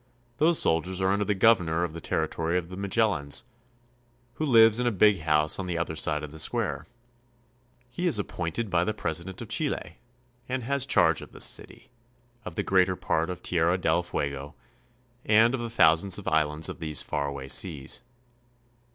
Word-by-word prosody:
Those 160 +3 +3
soldiers 90 +3 0
are 95 0 +1
under 100 +1 0
the 105 - 0
governor 90 -6 +3
of 85 -3 -3
the 85 - -8
territory 85 +2 -1
of 85 -1 -4
the 90 - -8
Magellans, 95 -7 0 0.9
who 155 +6 -3
lives 115 -3 +6
in 125 - 0
a - - +2
big 105 -1 +3
house 75 0 +1
on 95 - -4
the 85 -2 -3
other 85 -1 -3
side 75 -1 0
of 75 - -7
the 80 - -10
square. - - -1 1.0
He 175 +8 -2
is 155 - +2
appointed 100 +2 -4
by 85 -1 +2
the 110 +3 -2
president 85 +6 -3
of 110 - -12
Chile, 145 +5 -2 0.5
and 130 -1 -3
has 140 +2 0
charge - - +3
of - - -12
this - - +1
city, - - -3 0.5
of 80 - -7
the - - -2
greater 95 -1 +2
part 80 -1 -1
of 90 0 -7
Tierra 85 +1 +1
del 85 -1 +1
Fuego, 70 -4 -5 0.7
and 110 +3 +4
of 130 - -2
the 120 - -4
thousands 95 -3 +4
of 105 - -9
islands 80 0 +2
of - - -7
these 80 -3 -1
far 70 -1 -3
away 70 -1 -6
seas. 70 0 -1
90 Hz, 185 wpm, -26 LUFS, 80-110 Hz, 1.0 s, lives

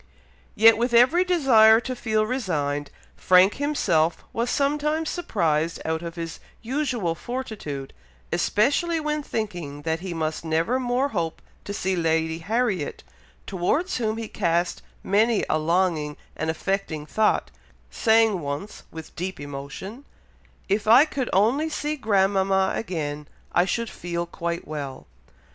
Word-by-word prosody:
Yet, 225 0 +6
with 240 0 +1
every 260 +10 +6
desire 250 -11 +6
to 255 +1 -4
feel 220 -3 0
resigned, 150 - -2 0.3
Frank 185 +2 +4
himself 175 - +1
was 235 +1 -1
sometimes 300 +3 0
surprised 165 - 0
out 160 0 -1
of 170 0 -6
his 165 -1 -6 0.2
usual 245 - -1
fortitude, 195 - -6 0.4
especially 305 +10 +1
when 300 0 -1
thinking 175 - -5
that 160 +1 -1
he 180 -1 -5
must 155 0 -2
never 165 +10 0
more 255 +2 0
hope 170 - -2 0.3
to - - -5
see 190 -1 -1
Lady 160 -1 0
Harriet, 205 -3 -1 0.4
towards 280 - 0
whom 220 -2 -1
he 225 -1 -4
cast 175 -3 0 0.2
many 215 +3 +2
a 155 - +1
longing 160 -2 0 0.2
and 160 - -2
affecting 160 -2 -2
thought, 215 +7 +1 0.4
saying 225 -3 +3
once, 145 +8 -5
with 160 -1 -10
deep 185 +3 -4
emotion, 145 - -8 0.6
"If 205 +2 0
I 245 +7 +8
could 270 -5 -3
only 245 +11 +2
see 300 -1 -2
grandmama 195 -5 +2
again, 150 -7 -4 0.2
I 175 - +3
should 230 +4 -1
feel 170 0 -4
quite 170 0 -4
well!" 140 -3 -6
195 Hz, 135 wpm, -24 LUFS, 165-245 Hz, 0.6 s, I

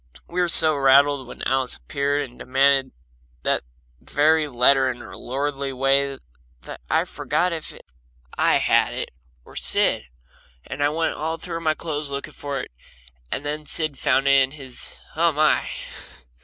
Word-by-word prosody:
We 180 +1 -2
were 175 - +1
so 160 -2 +7
rattled 140 0 +4
when - - -9
Alice 130 -1 0
appeared 140 0 -2
and 120 - -19
demanded 135 +1 +2 0.5
that - - +1 0.4
very 155 +1 +2
letter 130 0 +4
in 125 - -4
her 120 -2 -11
lordly 140 +1 -3
way 135 +1 +1 0.5
that - - -9
I - - +2
forgot 180 0 -1
if 160 -2 -5 0.6
I - - +3
had - - +2
it - - -4 0.4
or - - -16
Sid, - - +1 0.6
and 140 +2 -4
I 145 - +3
went 160 +2 -1
all 160 +2 -3
through 165 -1 -6
my 155 -2 0
clothes 150 -3 -3
looking 140 0 -5
for 140 -1 -5
it, - - -10 0.6
and 145 - -3
then 150 +1 -4
Sid 155 -4 0
found 135 -1 +2
it 140 0 +6
in 130 - +1
his, 135 -4 -6 0.2
and, 160 - -4
oh, 170 0 +4
my! 155 +1 +2
140 Hz, 165 wpm, -23 LUFS, 135-155 Hz, 0.6 s, so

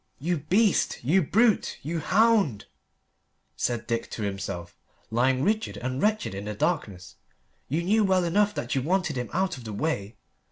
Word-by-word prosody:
"You 170 +5 -1
beast, 190 +8 +2
you 170 +10 +3
brute, 215 - +2
you 165 +4 -2
hound!" 200 - +2 0.9
said 120 -1 -1
Dick 115 0 -2
to 110 - -5
himself, 95 -3 -4 0.4
lying 130 +3 +2
rigid 215 +5 0
and 130 +1 -3
wretched 215 - +1
in 100 +1 -6
the 105 0 -4
darkness. 100 - -2 0.5
"You 160 +6 0
knew 215 +5 +3
well 190 -2 +3
enough 205 +4 +2
that 120 - -3
you 135 - +1
wanted 170 +1 0
him 125 -2 -3
out 185 -3 0
of - - -11
the 110 -2 -6
way. 105 -5 -2
155 Hz, 165 wpm, -26 LUFS, 115-190 Hz, 0.9 s, you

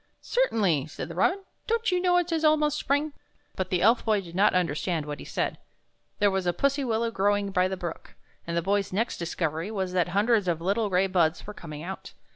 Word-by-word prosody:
" - - -44
" - - -46 0.2
Certainly," 190 - +2
said 155 - -7
the - - -6
robin, 385 +1 +1
" - - -43
don't 460 -2 +1
you 360 0 +1
know 355 -1 +3
it 350 -1 0
is 320 -1 0
almost 305 -1 +3
spring?" 285 +2 0 0.4
But 185 -1 -3
the 180 -1 +1
Elf 230 +4 +4
Boy 215 -2 +2
did 175 -3 -10
not 200 +2 +3
understand 165 -1 0
what 145 -2 -6
he - - -9
said. - - -2 0.6
There 205 -1 +3
was 190 -1 -1
a 175 - +2
pussy 280 - +1
willow 230 -1 0
growing 205 -1 +1
by 185 -1 +2
the 190 0 -4
brook, 175 -2 -7 0.3
and 170 0 -2
the 170 - 0
Boy's 200 +1 0
next 220 +6 -1
discovery 165 0 -2
was 190 -4 -3
that 180 -2 +2
hundreds 205 +2 +2
of 170 -2 0
little 200 +5 0
gray 185 0 +3
buds 175 -3 +1
were 210 - -7
coming 155 -6 -8
out. 190 +2 -7
195 Hz, 235 wpm, -27 LUFS, 175-235 Hz, 0.6 s, Elf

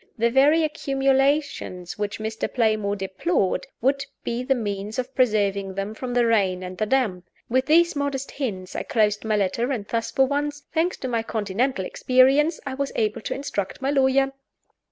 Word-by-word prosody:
The 235 +1 +2
very 290 +6 +5
accumulations 275 - 0
which 205 -1 -2
Mr. 220 +1 -3
Playmore 215 -4 +1
deplored 195 - -1
would 275 +3 +2 0.2
be 235 +1 -2
the 265 +1 +1
means 205 -2 -4
of 255 +1 -3
preserving 200 -6 +1
them 195 +2 -3
from 245 +2 -5
the 240 -1 +4
rain 195 -5 +2
and 185 0 -6
the 215 +3 -1
damp. 210 -9 0 0.2
With 260 +2 +1
these 340 +2 +4
modest 280 -1 -2
hints 190 -10 -4
I - - -1
closed 210 -2 +1
my 220 -1 0
letter; 210 +6 0
and 225 -6 -2
thus 230 -1 -1
for 265 - +3
once, 290 +1 -2
thanks 335 +3 +1
to 260 - -4
my 230 -2 0
Continental 220 0 -1
experience, 270 - +3
I 270 - -3
was 275 +1 -2
able 215 -1 0
to - - -3
instruct 235 -8 -4
my 270 +1 0
lawyer! 270 -1 +3
245 Hz, 175 wpm, -24 LUFS, 205-275 Hz, 0.2 s, very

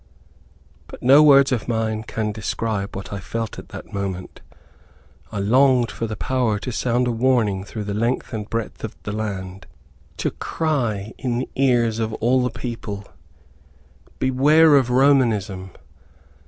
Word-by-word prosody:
But - - -12
no 135 +4 +7
words 140 -2 +6
of 120 -4 -1
mine 110 -2 -1
can 110 -1 -3
describe 105 -1 -3
what 95 +1 -7
I 100 - -4
felt 115 +3 -5
at - - -12
that - - -10
moment. 95 -2 -5 0.9
I - - -5
longed 125 +4 +3
for 115 - -4
the 110 - -4
power 125 -1 0
to 125 +5 -5
sound 125 +1 0
a - - +1
warning 115 -5 +1
through 105 +1 -6
the 100 0 -4
length 115 +4 -1
and 105 -1 -5
breadth 115 -3 -4
of - - -5
the - - -4
land, 95 -3 -5 0.5
to - - -1
cry 120 -10 -2
in 120 -2 -1
the 125 - -3
ears 120 -4 +2
of 110 -1 -2
all 125 +3 +2
the 125 - 0
people, 115 -4 -6 1.1
"Beware 145 +4 +5
of 130 -3 +3
Romanism!" 115 -8 +2
115 Hz, 155 wpm, -22 LUFS, 105-130 Hz, 1.1 s, no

